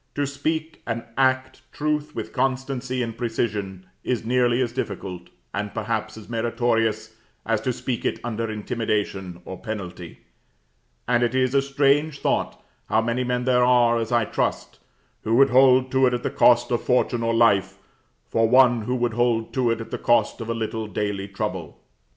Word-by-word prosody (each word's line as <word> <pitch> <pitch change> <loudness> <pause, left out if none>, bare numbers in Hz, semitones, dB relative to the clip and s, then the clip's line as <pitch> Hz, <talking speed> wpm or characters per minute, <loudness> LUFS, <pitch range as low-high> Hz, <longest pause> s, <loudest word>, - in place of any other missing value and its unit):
To 145 - 0
speak 155 +3 -3
and 115 0 -2
act 130 -1 +1
truth 150 0 -2
with - - -5
constancy 130 -1 -1
and 115 -1 -5
precision 105 -5 -3 0.2
is 120 -3 -2
nearly 120 0 +2
as 125 -3 0
difficult, 95 -7 -5 0.2
and 105 0 -3
perhaps 110 0 -3
as 110 - -11
meritorious, 115 -1 -1 0.3
as 110 -1 0
to 130 - 0
speak 125 0 -4
it - - -1
under 115 -1 -3
intimidation 105 -5 -3
or 95 - -7
penalty; 90 -6 -7 0.9
and 120 0 +2
it 120 +1 +1
is 130 0 +2
a 140 - +4
strange 140 +2 +1
thought - - -1 0.3
how 110 - +3
many 120 +2 -1
men 125 0 -1
there 125 -1 +3
are, 120 -1 +4
as 115 0 -3
I 120 -2 +3
trust, - - -2 0.4
who 115 - 0
would 135 +1 +5
hold 130 0 +5
to 130 0 +4
it 125 - +1
at 120 - -5
the - - -1
cost 120 0 +4
of 120 - +1
fortune 125 -1 +1
or 115 0 0
life, 100 -4 +3 0.5
for 115 0 +2
one 125 -2 +5
who 125 - -1
would 120 -2 0
hold 120 -1 0
to 130 -3 +1
it 115 - -1
at 115 - -9
the - - -3
cost 120 0 +2
of 115 - -6
a 115 - -1
little 110 -1 -3
daily 100 -2 -3
trouble. 100 -6 -5
120 Hz, 180 wpm, -24 LUFS, 110-130 Hz, 0.9 s, would